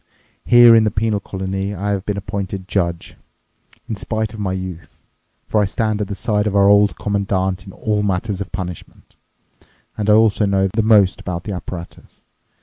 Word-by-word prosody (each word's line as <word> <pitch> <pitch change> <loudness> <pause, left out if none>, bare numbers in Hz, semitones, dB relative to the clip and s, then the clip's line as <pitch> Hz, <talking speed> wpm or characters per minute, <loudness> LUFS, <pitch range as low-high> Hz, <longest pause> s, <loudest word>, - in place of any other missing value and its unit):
Here 120 -1 +8
in 110 - +5
the 105 - +2
penal 105 0 -1
colony 95 +1 -4
I 100 +3 -2
have 100 -1 -3
been 105 -1 -1
appointed 100 -1 -5
judge. 85 -4 -2 0.7
In 110 - -3
spite 110 +2 -3
of 110 - -9
my 100 -2 -2
youth. 95 -2 -7 0.4
For 105 - +1
I - - +2
stood 110 +1 -1
at 105 - -2
the 100 - -5
side 105 -1 0
of 100 - -2
our 100 0 +5
Old 100 0 +4
Commandant 95 -2 -1
in - - -8
all 105 -1 -1
matters 100 0 -2
of 100 - -6
punishment, 90 -2 -8 0.8
and 105 0 -2
I - - +7
also 110 -1 +3
know 95 -1 +2
the 110 +4 0
most 105 -4 +4
about 90 0 -5
the 105 - -5
apparatus. 90 -1 -9
100 Hz, 185 wpm, -19 LUFS, 95-105 Hz, 0.8 s, Here